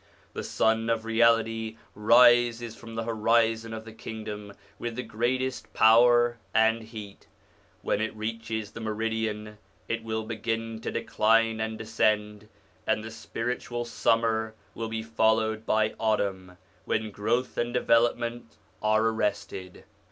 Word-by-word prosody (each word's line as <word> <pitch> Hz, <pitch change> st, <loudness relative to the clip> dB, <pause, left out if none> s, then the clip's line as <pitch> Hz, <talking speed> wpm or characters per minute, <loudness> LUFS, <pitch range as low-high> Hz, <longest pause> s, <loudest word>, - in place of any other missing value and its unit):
The -, -, -4 dB
Sun 110 Hz, +1 st, +1 dB
of 115 Hz, -1 st, 0 dB
Reality 115 Hz, -1 st, +2 dB, 0.2 s
rises 120 Hz, +1 st, +4 dB
from 115 Hz, -1 st, -11 dB
the 115 Hz, -, -2 dB
horizon 115 Hz, 0 st, +1 dB
of 110 Hz, 0 st, -6 dB
the 115 Hz, -, -10 dB
Kingdom 105 Hz, -2 st, -7 dB, 0.3 s
with 120 Hz, -1 st, -4 dB
the 125 Hz, -, -3 dB
greatest 130 Hz, +4 st, -2 dB
power 120 Hz, +1 st, +5 dB, 0.2 s
and 110 Hz, +1 st, +4 dB
heat. 110 Hz, -3 st, -10 dB, 0.6 s
When 105 Hz, -, 0 dB
it 110 Hz, 0 st, -2 dB
reaches 110 Hz, -1 st, -4 dB
the 115 Hz, -, -8 dB
meridian 110 Hz, -1 st, -3 dB, 0.3 s
it 115 Hz, 0 st, -2 dB
will 110 Hz, 0 st, -2 dB
begin 115 Hz, 0 st, -3 dB
to -, -, -3 dB
decline 115 Hz, 0 st, +2 dB
and 110 Hz, 0 st, -2 dB
descend, 105 Hz, -1 st, 0 dB, 0.4 s
and 110 Hz, -, +1 dB
the 110 Hz, -, -7 dB
spiritual 120 Hz, +1 st, -4 dB
summer 115 Hz, -1 st, +1 dB, 0.2 s
will 115 Hz, -1 st, -4 dB
be 110 Hz, 0 st, -3 dB
followed 110 Hz, 0 st, +1 dB
by 110 Hz, 0 st, +2 dB
autumn, 100 Hz, -5 st, -1 dB, 0.3 s
when 110 Hz, 0 st, -1 dB
growth 120 Hz, +5 st, -1 dB
and 120 Hz, 0 st, 0 dB
development 120 Hz, -1 st, +1 dB, 0.2 s
are 110 Hz, +1 st, +3 dB
arrested. 105 Hz, -4 st, -2 dB
110 Hz, 130 wpm, -27 LUFS, 110-115 Hz, 0.6 s, power